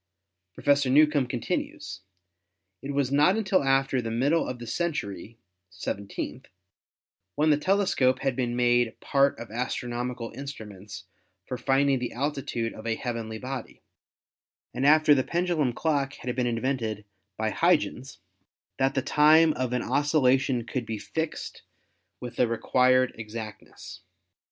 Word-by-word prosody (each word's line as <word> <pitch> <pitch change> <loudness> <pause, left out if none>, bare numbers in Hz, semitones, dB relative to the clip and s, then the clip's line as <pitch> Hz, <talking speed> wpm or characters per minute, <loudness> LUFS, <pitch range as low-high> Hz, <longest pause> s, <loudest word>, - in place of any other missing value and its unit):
Professor 140 -2 +2
Newcomb 145 -1 +4
continues: 120 -5 -4 0.8
"It 140 - -5
was 140 -2 0
not 150 +8 +4
until 195 -6 +1
after 135 -1 +2
the 115 - -4
middle 140 +8 +1
of 125 - -4
the 120 - -8
century 115 - -3 0.3
(seventeenth), 100 +2 -5 0.9
when 155 +2 +3
the 145 - +4
tele 195 +6 +2
scope 130 -7 +2
had 135 -2 0
been 120 -1 -1
made 120 -1 +2
part 140 0 +2
of 115 -2 -9
astronomical 120 0 -3
instruments 105 -8 -9 0.4
for 130 - -4
finding 135 +1 +2
the 125 - -4
altitude 130 -4 -2
of 110 - -9
a 115 - 0
heavenly 115 -3 -4
body, 130 +1 -7 0.9
and 135 - +1
after 155 0 +6
the 130 -2 +2
pendulum 170 -6 0
clock 140 0 -1
had 125 0 -5
been 125 -1 0
invented 115 -3 -2 0.3
by 110 0 -1
Huygens, 140 - +1 0.6
that 135 +1 +1
the 135 - 0
time 155 +2 +5
of 130 -2 -2
an 125 - -1
occultation 135 -4 +2
could 120 -2 -4
be 110 - -3
fixed 160 +8 -5 0.6
with 120 -1 -8
the 125 - +3
required 130 +2 +2
exactness. 110 0 -9
130 Hz, 135 wpm, -27 LUFS, 120-145 Hz, 0.9 s, after